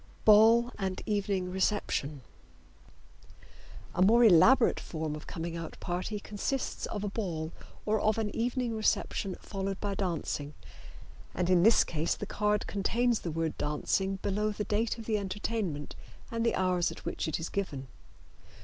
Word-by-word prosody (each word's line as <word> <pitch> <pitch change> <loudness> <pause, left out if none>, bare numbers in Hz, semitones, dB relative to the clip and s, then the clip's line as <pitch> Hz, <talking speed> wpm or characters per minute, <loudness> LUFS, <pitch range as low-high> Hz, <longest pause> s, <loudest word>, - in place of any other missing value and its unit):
Ball 225 +3 +6
and 190 -2 -2
Evening 200 -4 -1
Reception. 185 -7 -1 1.7
A - - -1
more 230 +6 +6
elaborate 225 +5 +6
form 155 -2 -4
of 150 - -10
coming 165 0 -5
out 165 -1 -7
party 185 +4 -3
consists 210 +6 -3
of 205 -2 -4
a - - -1
ball 170 -7 -3 0.3
or 215 0 +2
of 215 +1 +2
an 215 -2 -2
evening 240 0 -1
reception 210 -2 0
followed 195 -1 -4
by 205 -1 -2
dancing, 165 -6 -3 0.8
and 180 +1 0
in 180 -2 +5
this 225 +5 +6
case 160 0 -1
the - - -5
card 210 0 0
contains 230 +4 +1
the 170 - -4
word 165 0 -2
"Dancing" 190 +6 0
below 210 +2 0
the 210 0 -3
date 220 +3 0
of 225 - -8
the 215 -1 0
entertainment 200 -6 -3 0.4
and 230 0 -1
the 230 - +2
hours 180 -2 +1
at - - -11
which - - -3
it 160 - -1
is 165 - -4
given. 145 -10 -3
200 Hz, 155 wpm, -30 LUFS, 175-220 Hz, 1.7 s, Ball